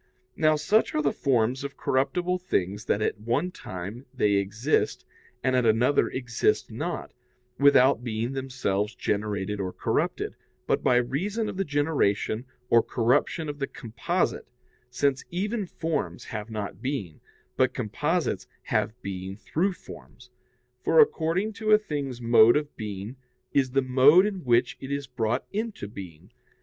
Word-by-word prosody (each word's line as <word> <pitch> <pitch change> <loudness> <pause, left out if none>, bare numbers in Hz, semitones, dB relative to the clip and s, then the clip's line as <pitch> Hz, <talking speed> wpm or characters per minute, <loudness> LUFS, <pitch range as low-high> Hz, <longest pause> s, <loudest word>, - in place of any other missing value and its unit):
Now, 155 -1 +3
such 155 +9 +2
are 155 - +2
the 140 - +2
forms 130 -1 +1
of 140 0 -6
corruptible 175 +7 0
things 100 - -2
that 105 - +1
at 110 - -1
one 120 +11 -1
time 105 - -7
they 120 -6 +1
exist 105 +8 0 0.4
and 130 +1 +2
at 125 - +3
another 115 +5 +3
exist 120 -4 0
not, - - -4 0.5
without 135 -3 +5
being 115 +1 -2
themselves 125 -6 -2
generated 105 -1 -2
or 95 -2 -2
corrupted, - - -1 0.3
but - - +1
by 125 - +3
reason 180 - 0
of - - -6
the 195 - +1
generation 145 - 0 0.2
or 115 -1 +5
corruption 130 +8 +1
of 145 -1 -5
the 135 - -1
"composite"; 115 -4 -2 0.4
since 135 +1 0
even 205 +3 -2
forms 150 - -3
have 105 +1 -6
not 105 -2 -5
being, 130 - -4 0.3
but 130 -1 +3
composites 150 - -1 0.2
have 110 +3 -1
being 95 0 -5
through 175 - -1
forms: - - -14 0.5
for, - - +4
according 195 - +3
to 215 0 +1
a - - +9
thing's 145 - -4
mode 115 +1 +6
of 150 0 -4
being, 105 +3 -6 0.4
is 135 -2 +3
the 135 +1 +1
mode 135 +8 +6
in 195 -3 -3
which 120 -1 +2
it 135 - -7
is 140 0 -2
brought 120 -3 -1
into 215 - -3
being. 90 -6 -10
130 Hz, 150 wpm, -26 LUFS, 110-150 Hz, 0.5 s, a